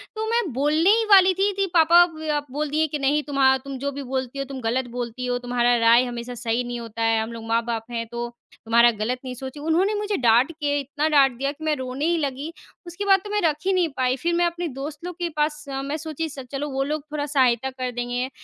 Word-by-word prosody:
तो 435 0 -2
मैं 470 +1 +2
बोलने 300 +7 +2
ही 450 +2 +4
वाली 380 -2 +7
थी, 390 +2 +1
थी 395 0 0
पापा 340 +1 +7
ब 320 -3 -11
अ, 295 -1 +2
बोल 295 +2 -2
दिए 310 +2 +1
कि, 300 0 -4
"नहीं, 285 +2 +2
तुम्हा 270 -2 +3
तुम 270 0 -8
जो 280 +2 -2
भी 280 0 -6
बोलती 260 0 -4
हो, 275 - -2
तुम 270 0 -7
गलत 245 +3 -1
बोलती 245 +1 -4
हो। 245 0 0
तुम्हारा 245 0 +1
राय 230 +1 +5
हमेशा 240 0 -6
सही 235 0 -1
नहीं 240 0 -5
होता 230 -1 -7
है। 225 -1 +2
हम 220 +1 -5
लोग 230 -1 -8
माँ-बाप 230 0 -1
हैं, 230 -1 -3
तो 240 0 -3 0.4
तुम्हारा 235 +1 +5
गलत 230 +3 -3
नहीं 255 -1 -5
सोचे" 265 +3 -8
उन्होंने 330 +7 +1
मुझे 415 0 -1
डाँट 240 +4 +4
के 290 -2 -1
इतना 285 +2 -2
डाँट 280 -3 +5
दिया 275 +2 -1
कि 300 +2 -12
मैं 310 -1 +1
रोने 260 +2 -4
ही 340 +1 +2
लगी, 285 +1 -3 0.4
उसके 345 +4 -5
बाद 390 -1 +5
तो 415 - -8
मैं 420 0 0
रख 315 -3 +2
ही 390 - +2
नहीं 360 -3 +2
पाई। 255 0 +1
फिर 340 +6 -1
मैं 345 +1 +2
अपने 345 0 -2
दोस्तों 295 +4 -6
लोग 360 - -9
के 345 -1 -1
पास 300 0 0
अ, 270 0 -3
मैं 280 +3 -3
सोची 320 0 -4
स 275 -2 -8
चलो, 285 +2 -3
वो 270 0 -1
लोग 300 +1 -3
थोड़ा 295 -1 -2
सहायता 265 -3 +2
कर 255 -1 -4
देंगे। 245 +1 -3
275 Hz, 255 wpm, -23 LUFS, 245-315 Hz, 0.4 s, वाली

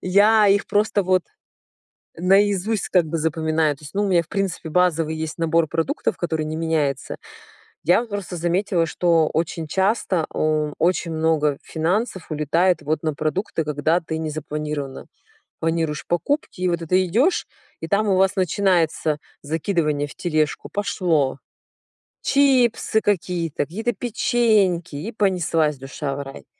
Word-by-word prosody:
Я 205 +3 +4
их 200 +1 +3
просто 205 -1 +1
вот 185 -1 +2 0.9
наизусть, 195 +3 +2
как 180 -3 +3
бы, 160 +1 -3
запоминаю. 160 -1 0
То - - -21
есть, 145 - -11
ну, 205 - +1
у - - 0
меня, 175 -2 +3
в 165 - -21
принципе, 190 -5 -3
базовый 165 -2 +2
есть 160 +1 -5
набор 165 -1 +2
продуктов, 165 +1 -1
который 160 -3 -2
не 155 +1 -4
меняется. 155 -5 -1 0.7
Я 175 +7 +4
вот 235 -2 -7
просто 195 -4 -4
заметила, 175 +1 +1
что 165 -1 +2
очень 165 0 -2
часто 190 -2 0
у 155 -1 0
очень 170 -1 +1
много 155 -3 +1
финансов 180 +2 -2
улетает 155 +3 +1
вот 155 +2 -1
на 155 -2 -1
продукты, 160 +2 -2
когда 150 +3 +1
ты 160 -1 -4
не 160 -1 -3
запланирована. 150 -2 -5 0.5
Планируешь 160 -2 -1
покупки, 180 - -1
и 180 - +2
вот 170 -1 -1
это 185 +3 +2
идёшь, 255 - +2 0.3
и 165 - -5
там 205 +3 +1
у 190 - +3
вас 190 0 +3
начинается 175 -5 +1 0.2
закидывание 150 -1 -1
в - - -12
тележку, 155 -3 -1
пошло. 165 -9 0 0.8
Чипсы 255 -5 +3
какие-то, 175 -5 -1
какие-то 220 +9 -2
печеньки, 205 -7 +1
и 200 +10 -5
понеслась 165 -8 +1
душа 135 +1 -5
в 140 - -4
рай. 135 0 -11
170 Hz, 145 wpm, -22 LUFS, 155-195 Hz, 0.9 s, Я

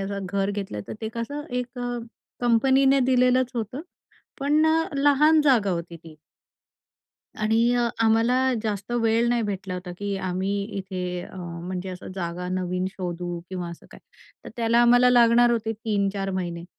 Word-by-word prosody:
असं 195 0 -4
घर 195 +1 -1
घेतलं 195 - -4
तर - - -5
ते 220 - -3
कसं 285 +6 -4
एक 250 0 -4
अ, 245 0 -3 0.4
कंपनीने 265 +3 +4
दिलेलंच 255 0 +3
होतं 235 +4 -4 0.6
पण 300 +3 +3
अ, 320 +1 +2
लहान 290 +3 +4
जागा 235 -9 +3
होती 170 -1 -4
ती. 160 -1 -15 1.2
आणि 220 +1 +2 0.2
अ, 240 -1 +2 0.2
आम्हाला 225 +3 +3 0.3
जास्त 210 0 -3
वेळ 230 +1 +2
नाही 240 -1 +1
भेटला 195 -3 -4
होता, 180 0 -6
की 205 -1 -2
आम्ही 185 +2 -2 0.3
इथे 180 -2 -4
अ, 190 - -11
म्हणजे 180 +1 -6
असं 180 0 -8
जागा 180 -1 -4
नवीन 185 0 -2
शोधू 175 -2 -5
किंवा 180 -2 -5
असं 170 - -12
काही, - - -14 0.4
तर - - -7
त्याला 230 0 +2
आम्हाला 245 +1 +5
लागणार 240 0 +5
होते 225 -1 0
3-4 200 -3 -2
महिने. 175 -3 -4
210 Hz, 155 wpm, -25 LUFS, 185-245 Hz, 1.2 s, आम्हाला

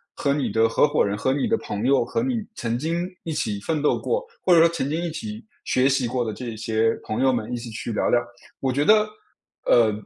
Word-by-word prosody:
和 140 -1 +1
你 145 -2 -1
的 115 0 +3
合 145 - +4
伙 145 - +2
人、 100 +1 -1
和 130 +5 +1
你 140 - 0
的 225 +1 +2
朋 105 - -4
友、 135 -3 +3
和 230 - -1
你 255 -2 0 0.2
曾 120 0 -2
经 170 +4 -1 0.2
一 160 - -3
起 105 -7 -2
奋 150 +8 -2
斗 150 - +2
过， - - -1 0.2
或 180 - +4
者 165 - +7
说 165 +1 +6
曾 165 -5 -2
经 160 +3 -1
一 170 - -2
起 215 +5 -6 0.2
学 130 +2 +3
习 130 -2 +1
过 125 0 -1
的 110 - -2
这 120 -2 -6
些 110 0 +1
朋 110 +4 -3
友 130 -1 +4
们， 115 -1 -3
一 - - -1
起 115 0 -7
去 115 +1 -5
聊 - - 0
聊。 120 - +4 0.4
我 130 -1 0
觉 145 +3 0
得， 215 0 +5 0.6
呃， 115 -3 +5
130 Hz, 270 characters per minute, -24 LUFS, 115-165 Hz, 0.6 s, 者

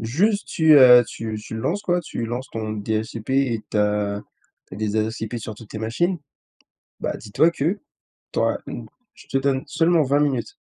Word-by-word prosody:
juste 190 - +1
tu, 160 -1 +4
heu, 125 -2 +9
tu 110 -1 -5
tu 105 - -8
le 110 - -4
lances, 190 - -1
quoi. 180 -3 +1
Tu 120 -8 -5
lances 120 +3 -4
ton 110 -1 -4
DSCP 110 +2 -3
et 130 -5 +1
tu - - -2
as 105 -1 +1 0.5
tu - - -9
as - - -8
des 110 0 -1
adresses 110 +1 -1
IP 110 +2 -4
sur 110 -1 -7
toutes 105 0 -13
tes 110 - -5
machines, 165 - 0 0.8
bah, - - -2
dis-toi 110 +10 +2
que 170 +6 -1 0.5
tu - - -2
auras - - +1
une - - -7 0.3
je - - -17
te 135 - +1
donne 135 -1 0
seulement 165 +1 +3
20 140 +1 +2
minutes, 135 -5 -1
120 Hz, 200 wpm, -23 LUFS, 110-150 Hz, 0.8 s, heu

